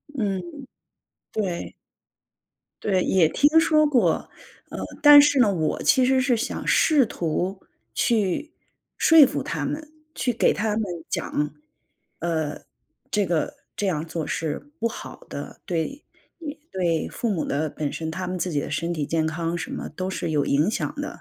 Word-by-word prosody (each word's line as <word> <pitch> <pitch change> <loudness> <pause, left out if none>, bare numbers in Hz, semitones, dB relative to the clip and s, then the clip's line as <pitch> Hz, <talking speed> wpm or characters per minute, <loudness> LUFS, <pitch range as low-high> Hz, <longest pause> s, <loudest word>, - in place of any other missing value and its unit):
嗯， 200 -7 -1 0.9
对。 190 -5 -3 1.1
对， 190 -3 +1
也 180 -4 +4
听 300 - +4
说 310 -1 +4
过。 240 - +2 0.4
呃， - - -6 0.2
但 290 -1 +10
是 285 -1 +3
呢， 220 -5 +5
我 160 -4 -1
其 260 - +4
实 260 +1 +3
是 255 -1 +2
想 225 - -3
试 300 -5 +4
图 180 0 -2 0.3
去 220 - 0 0.5
说 325 -3 +8
服 - - -2
他 - - -3
们， 305 0 -5 0.2
去 250 -5 -1
给 230 - +3
他 215 0 -1
们 220 - 0 0.3
讲， 150 -1 -2 0.7
呃， 160 -3 -2 0.5
这 210 -2 +1
个 170 -3 -1 0.2
这 205 - 0
样 160 -4 -1
做 160 -2 -4
是 165 - -3
不 230 - 0
好 - - -9
的， - - -8
对 180 - -3 0.7
对 170 -4 0
父 235 - -2
母 185 -6 -1
的 150 +2 -1
本 145 -1 -3
身 160 -1 -4
他 185 +3 -4
们 185 - -3
自 180 +1 -2
己 145 - 0
的 - - -4
身 170 +3 -2
体 155 -4 -2
健 160 +2 0
康 165 +1 -2
什 170 - -5
么 - - -4
都 185 +4 -4
是 190 - -3
有 145 -2 +1
影 150 +7 +2
响 225 - -2
的。 295 - -4
185 Hz, 175 characters per minute, -24 LUFS, 160-245 Hz, 1.1 s, 但